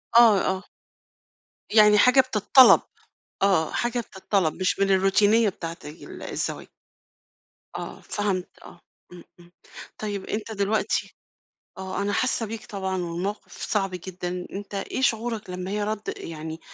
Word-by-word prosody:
آه، 225 -4 +7
آه. 190 +1 -1 1.1
يعني 210 -1 +7
حاجة 250 +5 +6
بتطلب، 255 +1 +6 0.6
آه، 185 -5 +2
حاجة 240 0 -1
بتطلب 190 -6 -1
مش 185 +1 -1
من 195 0 +2
الروتينية 205 +3 +4
بتاعة 165 -2 -7
ال 150 +3 -10
الزواج. - - -4 1.1
آه، - - -7
فهمت 195 -3 -2 0.2
آه، 175 - -14 0.3
إمم، 175 -1 -12 0.2
إمم، 175 0 -18 0.5
طيب 205 -2 -4
أنت 220 +1 -4
دلوقتي 210 +1 -1 0.6
آه، 190 +1 -4
أنا 205 0 -1
حاسّة 245 -1 0
بيك 220 0 -7
طبعًا 190 -2 -3
والموقف 175 +5 -5
صعب 195 -3 -1
جدًا، 180 0 -5
أنت 200 +1 -7
إيه 200 +6 -3
شعورك 225 -4 0
لمّا 180 +1 -5
هي 210 0 -1
رد 215 0 -3
يعني 160 0 -7
200 Hz, 135 wpm, -25 LUFS, 185-215 Hz, 1.1 s, آه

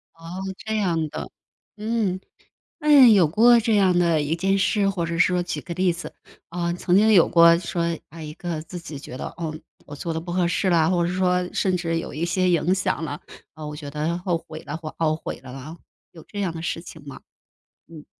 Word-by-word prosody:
哦， 165 +2 -9 0.2
这 220 0 -3
样 165 -6 0
的， 150 - -6 0.5
嗯， 215 -4 -1 0.6
那 295 -4 +7
有 200 -7 +6
过 235 +9 +5
这 225 -1 +1
样 190 -3 +4
的 170 -3 +3
一 150 +3 -1
件 195 +3 +1
事 195 0 +2
或 175 -4 -2
者 165 0 -3
说 180 -1 +3
举 180 +1 -4
个 170 - -6
例 180 -1 +2
子。 170 - -8 0.4
啊， 170 0 -2
曾 180 0 0
经 215 +2 +5
有 175 -5 +6
过 170 -1 +7
说， 170 -1 -2
啊， 165 +2 -11
一 150 -1 -7
个 170 -2 -5
自 175 +2 -8
己 160 -3 -8
觉 135 - -9
得， - - -5
哦， 160 -2 -4 0.3
我 145 - -9
做 165 +3 -4
得 160 - -2
不 175 +1 -7
合 175 0 +1
适 185 +2 0
了， 165 -2 +3
或 175 -2 +2
者 175 - -2
说 180 -1 +1
甚 185 -2 +1
至 165 -1 -1
有 - - -7
一 160 +3 -2
些 180 +1 +1
影 175 +1 +2
响 190 -3 -1
了， 145 -1 -6 0.3
啊， 155 -1 -9
我 150 0 -6
觉 150 -1 -7
得 155 +3 -2
后 180 -1 -1
悔 155 0 -8
了 145 - -5
或 155 -2 -7
懊 155 -1 +1
悔 155 - -6
了 130 - -11
啊， 135 +6 -9 0.3
有 165 - -13
这 205 - -7
样 185 - -1
的 165 - -6
事 165 0 -3
情 160 -2 -12
吗？ 140 - -9 0.7
嗯。 155 -3 -12
170 Hz, 240 characters per minute, -23 LUFS, 160-185 Hz, 0.7 s, 那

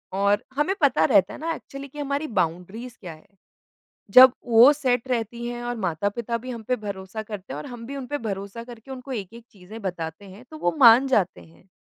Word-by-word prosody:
और 200 +1 +2
हमें 355 +7 +1
पता 275 -3 +4
रहता 200 - +3
है - - -9
ना 330 +1 -2
एक्चुअली 275 0 -10
कि 295 +2 -12
हमारी 285 +2 -2
बाउंड्रीज़ 190 +9 -3
क्या 175 -4 -8
है, 155 - -19 0.8
जब 255 +2 +9
वो 235 +4 +8
सेट 255 -3 0
रहती 235 -1 -3
हैं 240 0 -5
और 240 0 -3
माता-पिता 205 +6 -2
भी 255 +2 -9
हम 230 -2 -7
पे 250 - +2
भरोसा 200 0 -6
करते 210 -3 -8
हैं - - -5
और - - -8
हम 240 -2 -9
भी 280 +3 -7
उनपे 275 +2 -4
भरोसा 200 +4 -6
करके 240 +2 -12
उनको 265 +1 -8
एक-एक 230 +1 -6
चीजें 210 +3 -12
बताते 175 0 -5
हैं, 195 +5 -13
तो 310 - -8
वो 315 - -1
मान 245 +2 +8
जाते 195 -8 +1
हैं। 165 +3 -20
230 Hz, 210 wpm, -24 LUFS, 200-255 Hz, 0.8 s, जब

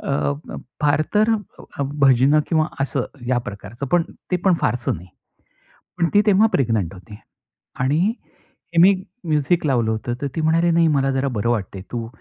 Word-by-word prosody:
अ, - - -4 0.4
अ, - - -5 0.3
फार 150 +1 +3
तर 215 +2 +4 0.7
भजनं 135 +2 +5
किंवा 155 -2 +2
असं 135 -1 -1 0.2
या 125 -1 +2
प्रकारचं, 105 +7 -7
पण 175 +5 +2 0.3
ते 180 - +2
पण 190 -2 +5
फारसं 125 +1 0
नाही. 90 +3 -13 0.9
पण 170 -1 +1
ती 205 - +6
तेव्हा 210 +1 +5
प्रेग्नंट 110 -9 0
होती. 100 +3 -12 0.6
आणि 155 - +2 0.7
मी 190 +4 +7 0.3
म्युझिक 155 +1 +1
लावलं 120 -6 +1
होतं 110 +2 -3
तर 140 - -1
ती 160 - -1
म्हणाली, 165 +2 +2
नाही 165 0 +4
मला 135 0 +1
जरा 135 +1 0
बरं 115 +3 0
वाटत 105 -5 -2
आहे, 95 - -7
तू 115 -2 -4
140 Hz, 165 wpm, -21 LUFS, 120-165 Hz, 0.9 s, मी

